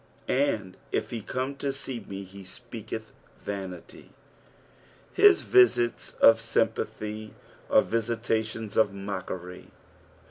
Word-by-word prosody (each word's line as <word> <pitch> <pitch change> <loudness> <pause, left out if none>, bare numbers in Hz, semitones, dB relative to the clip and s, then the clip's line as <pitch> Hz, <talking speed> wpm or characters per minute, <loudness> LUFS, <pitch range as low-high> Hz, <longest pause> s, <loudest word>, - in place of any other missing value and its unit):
"And 115 -9 0
if - - -1
fie 115 - -4
come 130 +6 -3
to 140 0 -1
tee 135 -2 -4
me, 100 0 -6
he 100 +1 -12
tpeateth 110 +2 -7 0.3
tanitij.'' 95 -4 -7 1.0
His 405 -3 +6
visits 370 - +3
nf 115 - +9
sympathy 110 -1 -2 0.3
are - - +6
Tisitations 115 -1 -2
of 105 -3 +4
mockery. 95 -2 -6
110 Hz, 105 wpm, -28 LUFS, 100-120 Hz, 1.0 s, nf